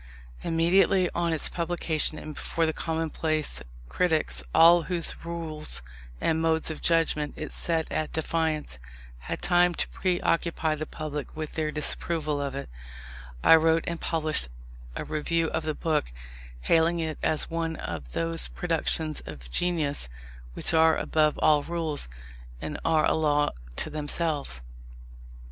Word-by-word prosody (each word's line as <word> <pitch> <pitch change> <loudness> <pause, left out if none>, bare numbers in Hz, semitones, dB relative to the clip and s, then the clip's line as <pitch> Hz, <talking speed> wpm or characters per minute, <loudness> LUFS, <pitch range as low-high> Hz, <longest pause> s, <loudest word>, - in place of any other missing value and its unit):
Immediately 180 +3 +3
on 170 -1 0
its 160 - +2
publication, 165 -2 -1
and 155 - -7
before 165 +2 -1
the 160 - 0
commonplace 160 - -1 0.3
critics, 155 - +1
all 170 - +7
whose 170 0 -2
rules 160 - -4 0.4
and 160 - +1
modes 160 0 +2
of 155 - -7
judgment 165 -3 +1
it 155 - -5
set 165 -2 0
at 155 - -1
defiance, 160 - -1 0.4
had - - -5
time 175 0 +4
to - - 0
pre 180 -2 0
occupy 165 -2 +1
the 155 0 -4
public 150 -1 -6
with 155 -1 -4
their 155 -1 -1
disapproval 155 0 -1
of 140 -1 -3
it, 140 - -5 0.8
I - - +9
wrote 160 +1 +3
and 170 -1 -4
published 155 - 0 0.5
a - - -4
review 165 +2 0
of 160 - 0
the 155 -1 -2
book, 155 - 0 0.5
hailing 165 - +3
it 160 -1 -3
as 155 - 0
one 165 -1 -1
of 80 - -6
those 165 0 +1
productions 160 -2 0
of 65 -6 -9
genius 150 - 0 0.5
which - - 0
are 160 0 +5
above 155 -1 +2
all 150 -1 +4
rules, 160 - -1 0.5
and 150 - -5
are 160 -1 +3
a - - +3
law 150 -2 +2 0.2
to - - -2
themselves. 150 - -2
160 Hz, 145 wpm, -27 LUFS, 150-165 Hz, 0.8 s, I